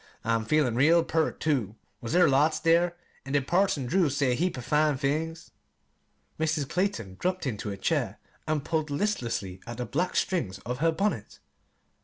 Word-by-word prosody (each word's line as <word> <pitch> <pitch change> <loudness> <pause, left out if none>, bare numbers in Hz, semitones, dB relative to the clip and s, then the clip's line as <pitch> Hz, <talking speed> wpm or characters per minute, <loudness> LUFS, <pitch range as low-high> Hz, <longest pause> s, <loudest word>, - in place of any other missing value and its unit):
"I'm 115 0 0
feelin' 145 -2 +2
real 160 +6 +5
pert, 160 -1 0
too. 125 -10 0 0.3
Was 115 - -4
there 180 +1 +6
lots 145 +3 +3
there? 170 +1 +3 0.3
An' 135 - -6
did 140 -2 +2
Parson 175 -6 +1
Drew 170 +5 +2
say 140 -1 +1
a - - +3
heap 175 +4 -1
o' - - -4
fine 150 +2 +2
things?" 160 +5 -2 0.9
Mrs. 155 -3 0
Clayton 130 - -2
dropped 185 -1 -1
into 105 -5 -3
a 100 - -5
chair - - -1 0.3
and 155 -2 -1
pulled 155 -2 -1
listlessly 120 - -2
at 120 -1 -6
the 125 - -3
black 175 +10 -1
strings 120 - 0
of 125 +1 -3
her 165 +2 +3
bonnet. 200 +6 -2
150 Hz, 175 wpm, -28 LUFS, 125-165 Hz, 0.9 s, there